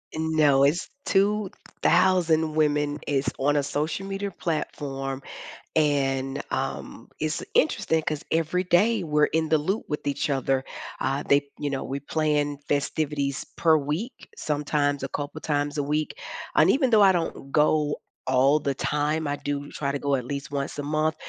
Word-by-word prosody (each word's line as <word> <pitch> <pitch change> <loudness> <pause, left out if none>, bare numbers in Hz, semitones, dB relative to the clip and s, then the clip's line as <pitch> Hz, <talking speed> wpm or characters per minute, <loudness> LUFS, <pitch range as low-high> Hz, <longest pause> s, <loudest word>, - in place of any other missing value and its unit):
No, 155 -3 +3
it's 150 +6 +2 0.2
2,000 185 -5 +2
women, 150 -1 +1
it's 140 -1 +1
on 145 +2 +2
a 145 - +3
social 155 +7 -2
media 195 0 -3
platform, 135 -5 -3 0.5
and, 135 -3 +1
um, - - -4
it's 155 0 -2
interesting 160 +1 +2
'cause 150 -1 -3
every 165 +3 +1
day 190 +4 +3
we're 150 -1 +3
in 160 0 0
the 160 - +4
loop 190 +9 -2
with 150 - -3
each 145 +2 -1
other. 135 -1 +1 0.4
Uh, 135 +2 -1
they 140 0 +3
you 145 - -1
know, 135 - -2
we 135 +1 -4
plan 145 0 0
festivities 145 -1 -1
per 160 -1 +5
week, 155 - -4
sometimes 145 -1 0
a - - -1
couple 145 +1 -5
times 145 0 -1
a - - +1
week. 150 - -1 0.4
And - - +5
even 265 -2 +3
though 215 -2 +6
I 195 - +7
don't 165 -5 -3
go 150 -1 +3 0.3
all 135 +3 +4
the 140 -2 -2
time, 150 +3 0
I 145 - 0
do 145 0 -4
try 140 -2 -2
to 140 - -2
go 140 0 +1
at 125 - -2
least 140 +2 -5
once 140 0 -3
a 145 - -3
month. 155 +2 0
150 Hz, 165 wpm, -26 LUFS, 140-160 Hz, 0.5 s, I